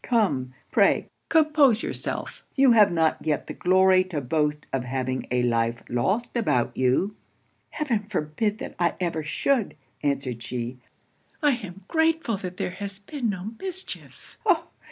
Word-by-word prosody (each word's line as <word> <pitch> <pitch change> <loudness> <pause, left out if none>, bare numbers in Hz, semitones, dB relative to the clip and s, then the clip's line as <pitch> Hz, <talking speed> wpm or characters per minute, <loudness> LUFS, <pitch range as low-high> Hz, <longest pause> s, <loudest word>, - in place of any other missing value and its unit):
Come, 145 - +1 0.2
pray - - +3 0.2
compose 300 -7 +4
yourself - - -4
you 270 -2 +6
have 215 -4 +6
not 160 -2 +1
yet 150 -3 0
the - - -6
glory 185 0 +4
to 175 -5 -3
boast 150 +2 0
of 135 -2 0
having 130 0 -2
a 125 0 +1
life 115 -1 +1
lost 190 - 0
about 165 - +1
you.' 130 +11 +1 0.5
'Heaven 240 -9 -1
forbid 205 +2 -1
that - - -6
I 175 -1 +2
ever 170 -3 -1
should!' 225 - 0 0.3
answered 135 -4 -1
she 120 +1 -4 0.6
'I 295 - +6
am 195 -4 -10
grateful 320 -8 +1
that 185 -2 -6
there - - -2
has 200 +1 -6
been 235 +4 -3
no 195 +1 -4
mischief! 375 0 -7
Oh! 375 -7 +2
185 Hz, 150 wpm, -25 LUFS, -, 0.6 s, you